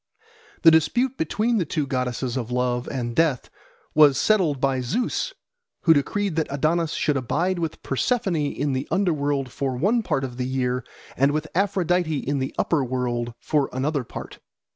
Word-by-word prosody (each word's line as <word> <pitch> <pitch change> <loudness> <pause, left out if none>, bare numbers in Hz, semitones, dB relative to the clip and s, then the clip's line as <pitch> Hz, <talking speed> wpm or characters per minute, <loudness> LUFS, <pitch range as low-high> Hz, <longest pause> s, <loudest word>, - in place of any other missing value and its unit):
The 165 - +9
dispute 240 - +2
between 220 +7 0
the - - +2
two 155 -1 -2
goddesses 125 -2 -2
of 120 -3 -3
love 125 0 -1
and 120 -3 -3
death 160 -6 +1 0.4
was 145 -3 +6
settled 175 -8 +2
by 135 -1 +1
Zeus, 240 - -1 0.5
who 165 - +6
decreed 190 +5 0
that 160 - +1
Adonis 155 +4 0
should 150 -2 +1
abide 170 +8 0
with 165 -2 -4
Persephone 185 - 0 0.2
in 145 -1 -1
the 130 +2 -2
under 190 -3 +2
world 140 -3 -1
for 135 -1 -2
one 210 - +2
part 135 -10 -1
of 125 -2 -5
the 125 0 -2
year, 125 -1 -1 0.3
and 140 +2 +3
with 155 +1 -1
Aphrodite 180 -4 +1
in 140 +1 -2
the 130 - -3
upper 155 -5 +1
world 120 -2 -2
for 145 -3 0
another 140 +2 -1
part. - - -9
145 Hz, 170 wpm, -24 LUFS, 130-170 Hz, 0.5 s, The